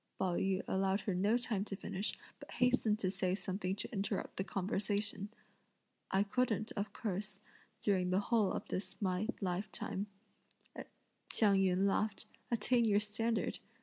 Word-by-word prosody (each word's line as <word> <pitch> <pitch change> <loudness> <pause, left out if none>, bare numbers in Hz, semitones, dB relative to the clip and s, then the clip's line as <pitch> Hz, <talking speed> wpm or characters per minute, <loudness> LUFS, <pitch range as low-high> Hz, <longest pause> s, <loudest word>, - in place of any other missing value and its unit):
Pao 185 -2 +1
yü 190 +1 +1
allowed 195 +1 +1
her 200 - -1
no 200 +6 +3
time 225 -5 -1
to 200 - -4
finish, 195 +1 -3 0.2
but - - -10
hastened 250 -4 +3
to 185 -3 0
say 185 -1 0
something 190 -1 -2
to 205 - -4
interrupt 200 -1 -2
the 190 - 0
conversation. 200 +1 -1 0.8
"I 195 +1 +3
couldn't, 220 0 0
of 205 -1 -3
course, 200 -1 -3 0.4
during 185 -3 +2
the 185 +1 +3
whole 210 -1 +2
of - - -3
this 190 - -3
my 190 +1 0
lifetime," 190 +1 -2 1.2
Hsiang 205 -3 +4
yün 190 0 +3
laughed, 200 +1 0 0.2
"attain 235 +1 +3
your 205 -2 +5
standard! 220 +2 -1
200 Hz, 150 wpm, -36 LUFS, 190-215 Hz, 1.2 s, your